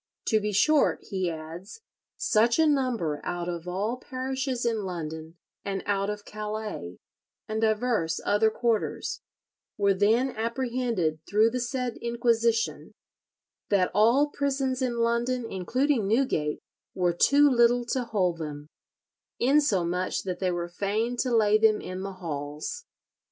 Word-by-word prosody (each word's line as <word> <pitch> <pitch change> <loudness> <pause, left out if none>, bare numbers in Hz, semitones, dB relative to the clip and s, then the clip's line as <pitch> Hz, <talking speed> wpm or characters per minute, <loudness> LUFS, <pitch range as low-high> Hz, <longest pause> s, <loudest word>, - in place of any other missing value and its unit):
"To 220 - +4
be 210 0 -2
short," 285 +10 +3
he 190 -2 0
adds, 165 - -8 0.4
"such 230 +2 +3
a 320 - +5
number 245 - 0
out 175 0 -3
of 170 -1 -5
all 205 +7 -2
parishes 260 -1 -3
in 225 -3 0
London, 160 -3 -6 0.3
and 195 -1 -3
out 200 0 0
of 210 0 -5
Calais, 210 - -5 0.5
and 220 0 -2
divers 220 -7 +1
other 205 +2 +3
quarters, 225 -1 -1 0.6
were 200 -1 +3
then 225 +7 +2
apprehended 235 -8 -1
through 215 +2 +4
the 250 - -2
said 250 -1 -3
inquisition, 235 -1 0 0.8
that 195 -3 +2
all 235 +8 +4
prisons 270 -2 -1
in 245 -2 -1
London, 235 +1 0
including 235 +4 0
Newgate, 205 - +1 0.4
were 180 -2 +1
too 285 +11 +5
little 240 -2 +4
to 255 - 0
hold 185 -7 0
them, 150 -2 -6 0.7
insomuch 190 - +1
that 180 -2 -4
they 185 - +1
were 175 -1 -2
fain 210 +7 -1
to 255 - 0
lay 215 -3 +4
them 215 -1 +4
in 185 +1 -6
the 195 0 -5
halls. 155 - -5
215 Hz, 135 wpm, -27 LUFS, 185-245 Hz, 0.8 s, a